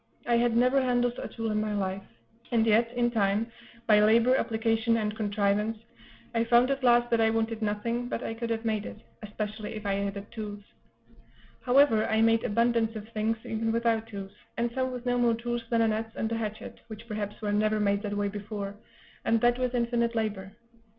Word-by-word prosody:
I 240 - +2
had 235 -1 +2
never 255 +3 +4
handled 245 -1 +1
a - - -4
tool 225 -1 -4
in 215 0 0
my 215 -1 -2
life; 190 -1 -2 0.5
and 230 -2 +2
yet, 225 +1 +3
in 240 -1 +1
time, 215 +1 +1 0.3
by 215 -2 +5
labor, 230 +4 +5
application, 225 -1 +1
and 210 -1 -2
contrivance, 210 +1 0 0.6
I 230 0 +2
found 240 +3 +4
at 275 -1 -2
last 240 -1 +4
that 230 -1 +3
I 220 - +4
wanted 225 0 -1
nothing 230 +3 -2
but - - -3
I - - -3
could 230 +1 -4
have 225 0 -2
made 215 -2 -1
it, - - -9 0.2
especially 215 +1 -5
if 215 0 -7
I 200 - +1
had 200 0 -2
had 200 +1 -8
tools. 205 -2 -6 1.0
However, 250 -4 +4
I 220 0 +1
made 225 0 +3
abundance 230 0 +1
of 215 0 -7
things, 225 0 -1
even 225 0 -1
without 230 -1 +1
tools; 195 -3 -7 0.3
and 235 0 0
some 260 +1 -1
with 250 -1 -7
no 245 0 +1
more 235 -1 +3
tools 240 +1 -3
than 230 -1 +3
an 220 -1 +2
adze 225 +1 -4
and 220 - -2
a - - 0
hatchet, 215 -1 -5
which 220 +1 -10
perhaps 210 -2 -4
were 210 -2 -2
never 215 +1 +2
made 200 -1 +1
that 205 -1 -3
way 205 0 0
before, 205 0 -5 0.5
and 230 - +2
that 240 +1 +3
with 250 -1 -1
infinite 235 -1 0
labor. 205 -3 -3
225 Hz, 205 wpm, -28 LUFS, 210-235 Hz, 1.0 s, by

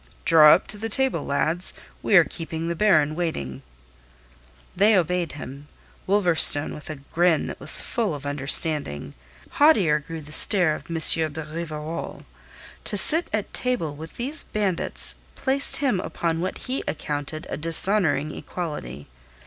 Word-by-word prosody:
"Draw 155 -2 +6
up - - -5
to 210 - -5
the 225 +1 -5
table, 260 - 0
lads. 160 +5 -3 0.3
We 210 - 0
are 175 - +7
keeping 165 0 -7
the 170 - -3
Baron 155 -6 +2
waiting." 70 - -5 1.1
They 210 +3 +3
obeyed 180 -2 -1
him, 140 0 -11 0.4
Wolverstone 175 -7 +5
with 150 0 -12
a 155 - -6 0.2
grin 170 -2 +1
that - - -8
was 140 +2 +4
full 220 -9 -3
of 145 0 -11
understanding. 140 - -1 0.5
Haughtier 200 - +3
grew 160 +2 -9
the 150 0 -14
stare 180 -1 +6
of - - -10
M. 165 - -5
de 160 -1 +1
Rivarol. 155 0 -8 0.6
To - - +1
sit 325 +2 +7
at 215 -1 -4
table 235 -13 -2
with 160 +2 -12
these 275 +6 -2
bandits 200 -5 -3 0.2
placed 275 +1 0
him 270 -9 -1
upon 165 -2 -4
what 185 - -4
he 260 +1 -4
accounted 150 0 -5
a - - -3
dishonouring 165 -2 +1
equality. 75 - -8
165 Hz, 150 wpm, -22 LUFS, 150-195 Hz, 1.1 s, are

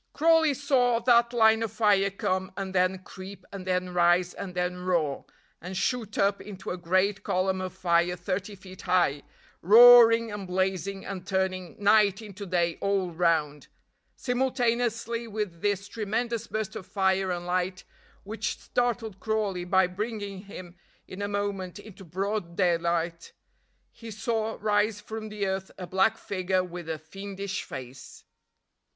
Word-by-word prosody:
Crawley 320 -1 +4
saw 255 -4 +2
that 235 -1 +4
line 220 -2 +4
of 225 -3 -2
fire 200 -3 +3
come 190 -1 -2
and 190 -1 -4
then 185 0 +1
creep 190 +2 -10
and 190 -2 -7
then 180 -1 -1
rise 175 0 +3
and 185 -2 -7
then 180 0 -1
roar, 170 -6 -1 0.4
and 180 +2 -6
shoot 225 0 -2
up 200 0 +2
into 195 -2 -7
a - - -2
great 185 +3 +1
column 185 +1 0
of 185 0 -4
fire 175 -1 +1
thirty 185 +3 -4
feet 185 -1 -12
high, 175 -6 +2 0.4
roaring 230 +2 +8
and 205 -2 -6
blazing, 190 +1 -2
and 185 -2 -6
turning 190 -2 -1
night 205 -1 +4
into 205 -2 -9
day 170 -2 0
all 195 -3 0
round. 160 -4 0 0.5
Simultaneously 240 -2 -1
with 205 -6 -4
this 200 -1 0
tremendous 230 +2 -2
burst 215 -2 -4
of 185 - -7
fire 190 -1 +1
and 175 -1 -3
light, 180 +1 -1 0.4
which 210 +1 -3
startled 235 -5 -2
Crawley 205 -5 -1
by 190 +1 +4
bringing 200 +1 -5
him 185 -3 -10 0.3
in 185 - -8
a 200 - -1
moment 200 -2 -3
into 205 -2 -12
broad 190 +1 -3
daylight, 170 -2 0 0.6
he 230 - -11
saw 225 +1 -2
rise 210 0 +1
from 220 +1 -7
the 210 -1 -3
earth 190 0 -2
a 185 - -6
black 190 +4 +2
figure 185 -1 -1
with 175 -2 -8
a 160 - -2
fiendish 195 +4 -6
face. 130 0 -10
195 Hz, 150 wpm, -27 LUFS, 180-215 Hz, 0.6 s, roaring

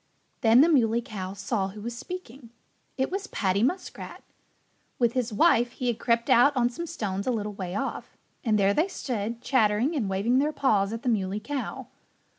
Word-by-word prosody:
Then 230 +1 +6
the 310 - +6
Muley 235 -7 +3
Cow 190 -4 -6
saw 200 0 -2
who 205 +2 -9
was 235 +2 -5
speaking. 270 -5 -8 0.5
It 265 +4 0
was 395 +2 -3
Paddy 195 - 0
Muskrat. 360 +10 -3 0.7
With 235 -2 +2
his 250 -2 -1
wife 240 -1 +3
he 255 - -5
had 240 -2 0
crept 235 0 +1
out 265 +4 +5
on 240 0 +2
some 340 +8 -6
stones 200 -6 -4
a - - +3
little 210 -3 -3
way 185 -2 -5
off. - - -4 0.3
And 220 -3 +2
there 200 0 +3
they 315 - +2
stood, 235 - -4
chattering 240 +4 +2
and 225 -9 -1
waving 210 +7 +1
their 300 +2 +1
paws 210 -8 +2
at 230 +1 -5
the 250 - 0
Muley 200 -2 0
Cow. 265 +5 -5
235 Hz, 190 wpm, -27 LUFS, 205-260 Hz, 0.7 s, Then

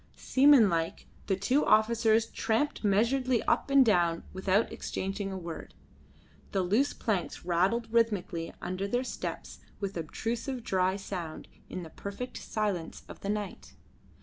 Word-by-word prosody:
Seamanlike, 225 - +4 0.2
the 195 - +2
two 250 +10 +2
officers 220 0 +4
tramped 230 +6 -1
measuredly 235 +5 +2
up - - +2
and 275 -1 +6
down 175 -6 +2
without 190 +3 +1
exchanging 195 +1 -3
a 190 - -4
word. 170 -3 -7 0.8
The 195 -2 +2
loose 220 +11 +2
planks 200 -6 -2
rattled 190 +7 +1
rhythmically 200 -7 +1
under 185 +2 -2
their 245 +5 0
steps - - -6 0.2
with 195 -1 -3
obstrusive 230 - -3
dry 185 -1 +1
sound 180 -5 -6 0.2
in 185 - -5
the 160 - -10
perfect 200 +6 -6
silence 200 -6 -3
of - - -10
the 200 - -5
night. 210 -1 -4
200 Hz, 135 wpm, -30 LUFS, 185-230 Hz, 0.8 s, and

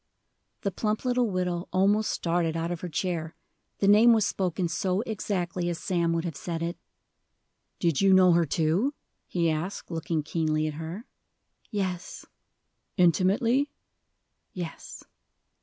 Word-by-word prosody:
The 200 - -1
plump 215 +4 -2
little 245 -2 +2
widow 180 -2 -2
almost 200 +3 +3
started 165 -1 0
out 165 +1 -2
of 175 - -4
her 180 - -4
chair, 165 -1 -2 0.4
the 195 - +1
name 220 +4 +7
was 220 -3 +3
spoken 180 -1 -1
so 185 +3 0
exactly 185 -6 -2
as 170 - -2
Sam 170 -2 0
would 165 +1 -1
have 165 -4 -4
said 165 +1 -4
it. 170 +1 -3 1.0
"Did 165 -6 +1
you 195 0 +5
know 185 -1 +7
her, 170 0 +4
too?" 175 - +1 0.3
he 170 -2 0
asked, 165 +5 -3
looking 165 -1 -2
keenly 155 -1 0
at 155 - -2
her. 175 +9 -6 0.6
"Yes." 185 -4 -4 0.7
"Intimately?" 200 - +3 0.8
"Yes." 175 -5 -7
180 Hz, 140 wpm, -27 LUFS, 165-200 Hz, 1.0 s, name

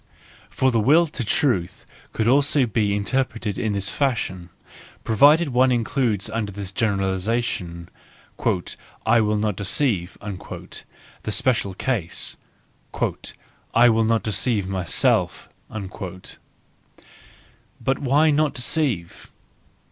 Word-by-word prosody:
For 130 0 +1
the 115 - +2
will 150 +10 +5
to 145 -5 -5
truth 105 -6 0 0.3
could 110 - -1
also 140 +1 +3
be 105 -2 0
inter¬ 130 +6 +1
preted 115 -5 -5
in 110 -4 -1
this 100 0 0
fashion, 105 -10 -2 0.5
provided 145 +8 +5
one 130 0 +3
includes 120 -4 0
under 110 -2 -3
the 100 +1 -6
generalisation, 95 -2 -1 0.5
" - - -10 0.6
I 115 +1 +4
will 105 0 +1
not 105 -1 0
deceive," 100 -2 0
the 105 +1 -9
special 105 -5 +1
case, 100 -7 -2 0.7
" - - -10
I 120 +1 +7
will 115 0 +3
not 115 0 +1
deceive 105 -2 0
myself." 95 -3 0 0.2
But 95 -3 -8 1.6
why 145 +4 +3
not 150 0 +1
deceive? 125 - -1
110 Hz, 110 wpm, -23 LUFS, 100-130 Hz, 1.6 s, I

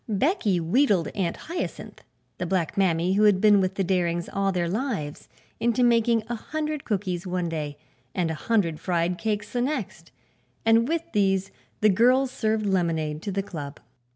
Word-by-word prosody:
Becky 215 - +1
wheedled 190 - +2
Aunt 180 -4 -2
Hyacinth, 340 +2 -6 0.4
the 180 - -2
black 180 -3 -1
mammy 180 -2 +2
who 210 +2 +4
had 205 -3 +5
been 205 -1 +5
with 185 0 -1
the 195 - 0
Darings 175 -2 0
all 195 0 0
their 175 -2 0
lives, 195 - -3 0.3
into 240 +1 +2
making 230 -1 +3
a 240 - -3
hundred 305 +5 -4
cookies 190 -4 -2
one 180 -1 -1
day 150 -3 -4 0.4
and 175 -3 0
a - - -2
hundred 170 -2 0
fried 175 0 -1
cakes 210 -2 -2
the 245 - 0
next, 240 - -3 0.6
and 225 +1 +4
with 330 +2 0
these 195 -1 +1 0.3
the 215 - +5
girls 250 +6 +4
served 220 -3 0
lemonade 165 -5 0
to 200 - -4
the 195 +1 -1
Club. 150 -7 -7
195 Hz, 170 wpm, -25 LUFS, 175-230 Hz, 0.6 s, had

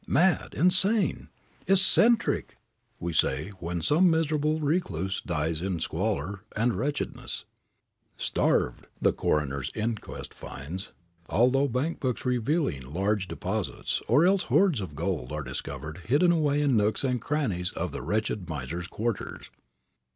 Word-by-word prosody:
"Mad! 175 +6 +2
Insane! 190 +6 +3 0.4
Eccentric!" 200 +4 +4 0.4
we 85 0 -3
say 75 +3 +1
when 85 -1 -3
some 165 - +5
miserable 155 -1 +1
recluse 100 - -1
dies 80 -1 -1
in 95 -2 -2
squalor 95 +2 -2 0.2
and 115 +2 +2
wretchedness, 140 +9 -3 0.7
"Starved," - - 0
the - - +3
coroner's 70 -3 -1
inquest 110 0 -4
finds, 80 +8 -7 0.4
although 130 +6 +3
bank 135 +6 -1
books 130 -2 -2
revealing 125 - 0
large 95 +3 0
deposits, 95 +4 -3
or 145 +8 +5
else 190 +1 +3
hoards 180 - +3
of 90 -6 -6
gold, 80 -5 -2
are 75 0 -3
discovered 75 +5 -6
hidden 145 - +3
away 150 -3 +2
in 140 -4 +3
nooks 105 +3 +2
and 125 -3 0
crannies 110 -13 -1
of - - -3
the - - -5
wretched 105 +2 -2
miser's 80 +4 -4
quarters. 115 +2 -4
110 Hz, 130 wpm, -28 LUFS, -, 0.7 s, some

